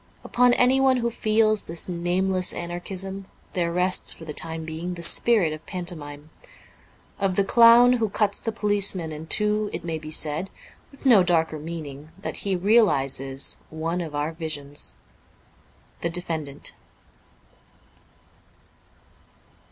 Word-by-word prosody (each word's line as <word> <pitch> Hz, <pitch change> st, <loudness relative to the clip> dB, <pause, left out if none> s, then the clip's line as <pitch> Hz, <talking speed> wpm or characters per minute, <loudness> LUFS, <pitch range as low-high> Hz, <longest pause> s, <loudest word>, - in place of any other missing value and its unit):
Upon 245 Hz, 0 st, +3 dB
anyone 260 Hz, +1 st, +3 dB
who 235 Hz, -1 st, -1 dB
feels 215 Hz, -1 st, +1 dB
this 165 Hz, 0 st, -3 dB
nameless 180 Hz, +1 st, 0 dB
anarchism 190 Hz, +3 st, -6 dB, 0.3 s
there 170 Hz, -2 st, -1 dB
rests 180 Hz, +2 st, +3 dB
for 165 Hz, -, -8 dB
the 150 Hz, -, -6 dB
time 160 Hz, +1 st, -1 dB
being 165 Hz, +3 st, -5 dB
the 170 Hz, -, -7 dB
spirit 200 Hz, -5 st, +4 dB
of 155 Hz, -, -9 dB
panto 180 Hz, -1 st, -3 dB
mime. 145 Hz, 0 st, -11 dB, 0.9 s
Of 195 Hz, -2 st, 0 dB
the 200 Hz, -, +3 dB
clown 235 Hz, +4 st, +6 dB
who 230 Hz, -3 st, 0 dB
cuts 205 Hz, 0 st, 0 dB
the 225 Hz, -, -3 dB
policeman 200 Hz, -6 st, 0 dB
in 155 Hz, +1 st, -8 dB
two 210 Hz, +2 st, +2 dB
it -, -, -6 dB
may 165 Hz, -2 st, -3 dB
be 155 Hz, 0 st, -9 dB
said 155 Hz, +4 st, 0 dB, 0.4 s
(with 275 Hz, 0 st, -18 dB
no 235 Hz, -7 st, +7 dB
darker 165 Hz, -3 st, +1 dB
meaning) 155 Hz, -2 st, -8 dB
that 195 Hz, -, -5 dB
he 195 Hz, -2 st, -2 dB
realizes 135 Hz, -, +2 dB
one 165 Hz, +3 st, -3 dB
of 155 Hz, -3 st, -6 dB
our 145 Hz, +2 st, -2 dB
visions. 150 Hz, -3 st, -6 dB, 0.6 s
' -, -, -33 dB
The 170 Hz, -, -1 dB
Defendant.'' 160 Hz, -5 st, -4 dB
175 Hz, 135 wpm, -24 LUFS, 160-210 Hz, 0.9 s, no